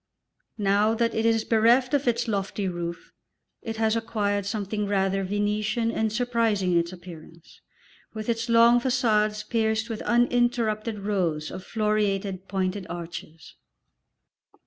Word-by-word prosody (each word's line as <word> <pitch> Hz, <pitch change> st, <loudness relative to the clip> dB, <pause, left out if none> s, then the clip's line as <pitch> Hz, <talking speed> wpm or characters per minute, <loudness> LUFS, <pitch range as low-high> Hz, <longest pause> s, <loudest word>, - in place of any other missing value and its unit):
Now 205 Hz, +2 st, +2 dB
that 230 Hz, 0 st, 0 dB
it 225 Hz, +1 st, +1 dB
is 225 Hz, -1 st, +2 dB
bereft 235 Hz, +4 st, +3 dB
of 280 Hz, -2 st, +1 dB
its 235 Hz, 0 st, +1 dB
lofty 200 Hz, -1 st, -2 dB
roof 170 Hz, -1 st, -5 dB, 0.5 s
it 225 Hz, -1 st, -5 dB
has 220 Hz, 0 st, +2 dB
acquired 205 Hz, -3 st, -1 dB
something 210 Hz, 0 st, -2 dB
rather 195 Hz, -1 st, +1 dB
Venetian 210 Hz, +3 st, -1 dB
and 220 Hz, -1 st, -1 dB
surprising 225 Hz, -5 st, 0 dB
in 170 Hz, -, +4 dB
its 170 Hz, +1 st, -2 dB
appearance, 170 Hz, -2 st, -13 dB, 0.5 s
with 215 Hz, -1 st, -6 dB
its 230 Hz, 0 st, -1 dB
long 235 Hz, +1 st, +6 dB
façades 215 Hz, -4 st, +1 dB
pierced 220 Hz, 0 st, 0 dB
with 220 Hz, -, -4 dB
uninterrupted 235 Hz, -3 st, +1 dB
rows 175 Hz, -7 st, -1 dB
of 185 Hz, 0 st, -7 dB
floreated 200 Hz, -3 st, -1 dB
pointed 190 Hz, 0 st, -2 dB
arches. 170 Hz, -2 st, -8 dB
215 Hz, 130 wpm, -26 LUFS, 195-230 Hz, 0.5 s, long